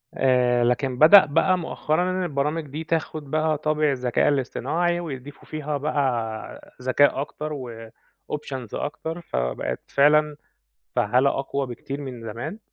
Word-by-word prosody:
آآ 125 -2 +3
لكن 125 +1 0
بدأ 175 +5 +9
بقى 185 +6 +2
مؤخرًا 175 +1 -1
إن 185 0 -1
البرامج 150 0 -1
دي 150 +4 -5
تاخد 155 -3 -3
بقى 155 -1 +1
طابع 155 -1 +1
الذكاء 125 -2 +1
الاصطناعي 170 +5 0
ويضيفوا 145 -3 -8
فيها 150 -1 -3
بقى 125 -7 -2
ذكاء 135 +2 +3
أكتر 150 +1 -5 0.8
وoptions 135 -5 -5
أكتر، 160 +5 -4
فبقِت 60 - -3
فعلًا 150 +1 +4 0.6
فعّالة 130 +2 +3
أقوى 135 0 -2
بكتير 135 +3 -6
من 125 -4 -7
زمان، 120 - -6
145 Hz, 125 wpm, -24 LUFS, 130-155 Hz, 0.8 s, بدأ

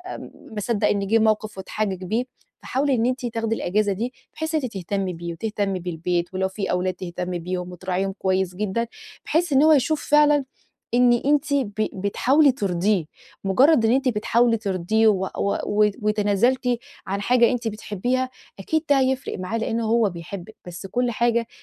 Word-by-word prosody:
ام - - -9 0.2
مَا 215 - -4
صدّق 210 0 +1
إن 200 -1 0
جِه 225 +3 +4
موقف، 215 -1 +1
واتحجج 190 -1 -3
بيه. 220 +7 0 0.4
فحاولي 270 +1 0
إن 230 -1 +1
أنتِ 255 0 -1
تاخدي 225 -1 -1
الأجازة 205 +1 0
دي، 235 +6 -3 0.2
بحيث 315 0 -3
إن 310 - +2
أنتِ 250 - -4
تهتمي 190 0 -2
بيه، 170 0 -6
وتهتمي 200 0 -2
بالبيت، 175 0 -2
ولو 190 0 0
في 190 +1 -3
أولاد 180 +1 0
تهتمي 180 0 -4
بيهم، 180 +1 -4
وتراعيهم 185 +2 -2
كويس 190 -1 0
جدًا، 210 +4 -1 0.4
بحيث 325 0 +1
إن 270 +2 +5
هو 315 - +6
يشوف 305 +1 +2
فعلًا 295 -2 +5 0.5
إن 245 0 +5
أنتِ 285 +4 +1
ب 260 -8 0 0.2
بتحاولي 255 +9 +3
ترضيه. 195 - 0 0.4
مُجرّد 240 +6 +4
إن 225 - +3
أنتِ 265 +1 +1
بتحاولي 230 +1 +2
ترضيه 210 +1 +1
و 190 -3 +3
و 200 - 0
و 210 0 +3
وتنازلتِ 210 +5 +1 0.4
عن 200 +1 -2
حاجة 240 +3 +4
أنتِ 245 -2 -2
بتحبيها، 225 +4 -2 0.3
أكيد 315 +11 -1
ده 280 -1 +5
هيفرق 260 -4 -1
معاه، 185 +5 -2
لإن 225 0 -1
هو 225 -1 +2
بيحبِك. 175 +4 -8
بس 175 +2 -8
كل 245 +4 0
حاجة 235 0 +1
215 Hz, 170 wpm, -23 LUFS, 190-245 Hz, 0.5 s, هو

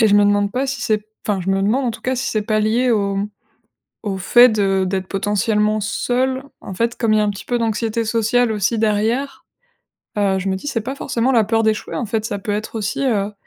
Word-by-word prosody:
et 220 - +5
je 205 - +4
me 205 - +5
demande 205 0 +2
pas 265 +2 -1
si 270 -2 -3
c'est 215 -1 +2
p 210 - -25 0.2
enfin 200 -2 +1
je 195 - -1
me 195 0 +1
demande, 250 +7 +1
en - - +1
tout 225 - -9
cas, 260 0 -1
si 265 +2 -2
c'est 215 -3 0
pas 215 0 0
lié 235 +4 +2
au 200 -3 +1 0.9
au 195 -2 -2
fait 240 +6 +6
de 195 -3 +1
d'être 190 0 -2
potentiellement 210 +2 +1
seule. 255 +4 -1 0.2
En 190 - -7
fait, 230 +3 -1
comme 225 -2 +2
il - - +4
y - - +3
a - - +2
un 205 - +1
petit 195 - -9
peu 245 -1 -1
d'anxiété 225 0 -1
sociale 230 +1 +2
aussi 215 +2 0
derrière, 225 +6 0 0.7
heu, 195 -2 +2
je 195 - -3
me 190 - 0
dis: 290 - -9
«C'est 230 - -1
pas 265 +4 -5
forcément 245 0 0
la 225 -3 +4
peur 225 +1 +1
d'échouer 215 -1 -1
en 235 - -2
fait, 220 0 -2
ça 205 -2 -3
peut 205 - -3
être 215 +2 -4
aussi, 220 +6 -2
heu, 210 -4 0
215 Hz, 250 wpm, -19 LUFS, 205-235 Hz, 0.9 s, fait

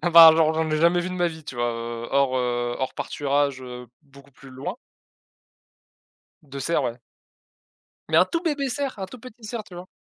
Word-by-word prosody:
Enfin, 165 -2 +9
genre 160 -1 +4
je 160 - 0
n'en 160 - -1
ai 155 - +1
jamais 170 +3 +4
vu 180 - -3
de 185 - -5
ma 175 -1 +1
vie, 160 -2 -10
tu - - -8
vois? 120 0 0
Heu, 115 0 -5
hors, 135 -1 +2
heu, 120 -1 -1
hors 130 - -3
pâturage, 140 -2 -1
heu, 125 -1 -8 0.2
beaucoup 140 -1 -18
plus 135 +1 -15
loin. 130 +1 -5 1.7
De 140 -2 -9
cerfs, 165 +6 +1
ouais. 120 +1 -3 1.1
Mais - - +2
un - - +7
tout 335 - -2
bébé 290 -5 -1
cerf, 275 -2 -3
un 190 - -4
tout 255 - -11
petit 240 -1 -13
cerf, 220 +1 -4
tu 180 - -14
vois? 175 +1 -8
150 Hz, 210 wpm, -24 LUFS, 130-180 Hz, 1.7 s, Enfin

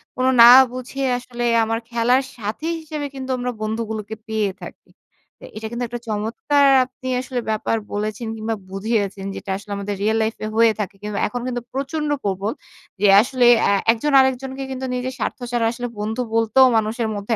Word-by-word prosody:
কোনো 255 0 +1
না 235 - +11 0.3
বুঝে 255 +2 -6 0.2
আসলে 245 -1 -6 0.2
আমার 225 +1 -1
খেলার 240 +3 +2
সাথী 225 +8 -5
হিসেবে 305 -2 -5
কিন্তু 265 -1 -6
আমরা 250 0 -2
বন্ধুগুলোকে 220 -1 -4
পেয়ে 215 -2 0
থাকি। - - -11 0.5
তো - - -10
এটা 220 0 -5
কিন্তু 240 +1 -3
একটা 240 +1 -6
চমৎকার 230 +7 +1 0.2
আপনি 260 0 -11
আসলে 255 -1 -4
ব্যাপার 220 +1 0 0.2
বলেছেন 215 +2 -3
কিংবা 220 0 -3
বুঝিয়েছেন 200 -1 -2
যেটা - - -8
আসলে 205 0 -12
আমাদের 200 0 -4
রিয়েল 220 +1 +2
লাইফে 220 0 -3
হয়ে 230 0 +5
থাকে। 200 -1 -3
কিংবা 210 -1 -4
এখন 245 +3 -5
কিন্তু 245 -1 -3
প্রচন্ড 295 +3 -2
প্রবল, 200 +1 -1 0.5
যে 205 - +5
আসলে 250 0 +1 0.2
অ্যা 200 - +3 0.2
১ 230 - -2
জন 295 -1 +1
আরেকজনকে 265 +1 0
কিন্তু 260 0 -4
নিজের 255 +1 -3
স্বার্থ - - -2
ছাড়া 240 -2 +1
আসলে 245 +1 -5
বন্ধু 220 +4 -2
বলতেও 230 +3 +5
মানুষের 220 +1 -1
মধ্যে 205 +3 -2
230 Hz, 175 wpm, -21 LUFS, 215-255 Hz, 0.5 s, না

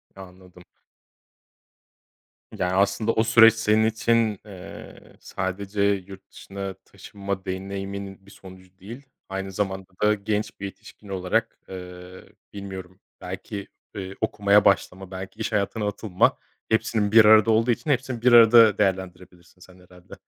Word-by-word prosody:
Ya 95 - -11
anladım. 90 -1 -15 1.9
Yani 90 0 -2
aslında 100 +3 +1
o 110 - +2
süreç 115 0 +7
senin 110 -1 +2
için, 110 -2 +1
eee, 95 -3 -12
sadece 100 +2 -4
yurt 100 -1 -2
dışına 95 0 -7
taşınma 100 -1 -7
deneyimin 95 +1 -6
bir 100 - -17
sonucu 95 -1 -16
değil, 115 +9 -10 0.3
aynı 95 0 -5
zamanda 95 -1 -3
da 105 0 +4
genç 105 0 -3
bir 100 - -5
yetişkin 100 +1 -12
olarak, 90 -1 -2
eee, 90 0 -10 0.3
bilmiyorum 95 -2 -9 0.2
belki, 95 +2 -7 0.3
eee, 95 -1 -6
okumaya 100 0 +2
başlama, 95 -1 0
belki 95 +3 -8
iş 110 - -3
hayatına 105 +1 -1
atılma 105 -2 0 0.3
hepsinin 110 -2 0
bir 110 -1 +7
arada 110 +1 +6
olduğu 115 +2 +2
için 145 - -3
hepsini 130 -3 -1
bir 125 0 +4
arada 115 -2 +7
değerlendirebilirsin 90 -2 -4
sen 90 0 -17
herhâlde. 90 0 -17
100 Hz, 135 wpm, -24 LUFS, 95-110 Hz, 1.9 s, süreç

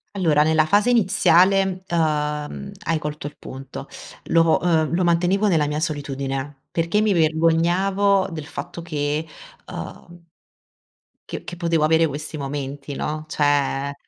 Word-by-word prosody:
Allora 160 -6 +3
nella 155 0 +3
fase 205 +8 +3
iniziale, 190 -3 +3
emh, 150 +1 -1
hai 165 - +1
colto 150 -1 -5
il 145 - -10
punto. 135 0 -9 0.4
Lo, 165 -1 +4
uhm, 160 -4 +1
lo 180 - +1
mantenevo 175 +4 +2
nella 160 -6 +2
mia 150 +1 -2
solitudine, 140 -3 -4
perché 170 +5 0
mi 215 -1 +2
vergognavo 175 +5 +2
del 155 -3 -6
fatto 170 +5 -7
che, 150 -1 -2 0.4
umh 175 -1 -9 1.0
che - - -6
che 175 - -8
potevo 165 -2 +1
avere 160 +1 +4
questi 150 +2 -6
momenti, 140 0 -5
no, 155 +2 -4
cioè 140 -2 0
160 Hz, 130 wpm, -22 LUFS, 150-175 Hz, 1.0 s, Lo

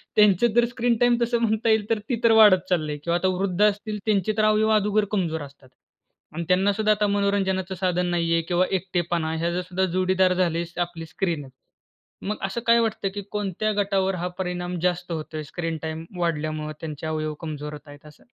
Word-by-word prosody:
त्यांचं 210 +2 +4
जर 240 0 +5
screen 240 0 0
time 245 -1 +4
तसं 235 0 +1
म्हणता 220 0 +1
येईल 220 -1 +2
तर 225 -2 +1
ती 240 - 0
तर 230 - +5
वाढत 185 -4 +6
चालले 155 -5 0
किंवा 170 +4 -1
आता 185 +2 0
वृद्ध 190 -1 -1
असतील 210 +1 -5
त्यांचे 215 -1 +1
तर 215 - +3
अवयव 215 0 +3
अगोदर 210 0 +2
कमजोर 170 -6 -1
असतात. 140 -2 -12 0.6
आणि 170 +2 -3
त्यांना 190 +3 +3
सुद्धा 215 +1 +1
आता 210 0 +2
मनोरंजनाचं 195 -2 0
साधन 180 -1 0
नाही 170 -1 0
आहे 165 - +3
किंवा 180 +1 +2
एकटेपणा 175 -3 -2
हे 170 +1 -1
जर 180 - -1
सुद्धा 180 +1 -1
जोडीदार 185 0 +2
झाले 175 -2 +1
आहे 170 +1 -6
आपली 170 -1 -4
स्क्रीन 160 -1 -2
आहे. 130 - -15 0.8
मग 210 - -2
असं 235 +5 -4
काय 230 0 +6
वाटतं, 220 -3 -1
की 205 - -3
कोणत्या 210 +1 -1
गटावर 195 -1 0
हा 180 +1 -3
परिणाम 180 -1 -3
जास्त 180 -1 -1
होतोय? 155 -1 -5
स्क्रीन 165 +2 -4
टाईम 160 0 -4
वाढल्यामुळं 155 -2 -2
त्यांचे 155 -1 -5
अवयव 155 -1 -2
कमजोर 150 -2 -5
होत 150 0 -11
आहेत 145 +1 -14
असं? 150 - -17
180 Hz, 200 wpm, -24 LUFS, 165-210 Hz, 0.8 s, वाढत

